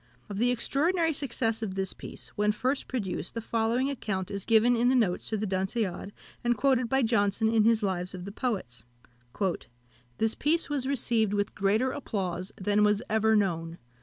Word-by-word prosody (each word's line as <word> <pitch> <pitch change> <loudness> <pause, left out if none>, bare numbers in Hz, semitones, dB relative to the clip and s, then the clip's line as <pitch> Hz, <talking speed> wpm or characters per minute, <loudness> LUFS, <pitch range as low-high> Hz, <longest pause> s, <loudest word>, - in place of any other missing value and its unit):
Of 200 -1 -4
the 245 +2 +3
extraordinary 320 +7 +1
success 235 -5 -1
of 200 -4 -3
this 190 -1 -1
piece, - - -8
when 210 0 +1
first 260 +6 -1
produced, 200 -7 -3
the - - -1
following 230 +3 0
account 195 -8 -3
is 200 -1 -5
given 230 +2 +4
in 240 +1 +3
the 260 - +3
notes 205 -8 +1
to 220 - 0
The 210 - -2
Dunciad, 190 0 -2 0.3
and 240 -1 +1
quoted 255 -2 +2
by 265 +1 +2
Johnson 220 -1 +2
in 220 -2 +4
his 225 -1 +3
Lives 185 -1 -2
of 180 0 -7
the 200 - -6
Poets: 185 - -3 1.3
"This 225 0 +1
piece 315 +1 0
was 270 -3 -1
received 230 -6 +1
with 205 0 -1
greater 215 +6 +1
applause 185 -8 -3
than 205 +2 +2
was 210 +2 +2
ever 220 0 +3
known. 170 -5 0
220 Hz, 180 wpm, -28 LUFS, 195-245 Hz, 1.3 s, given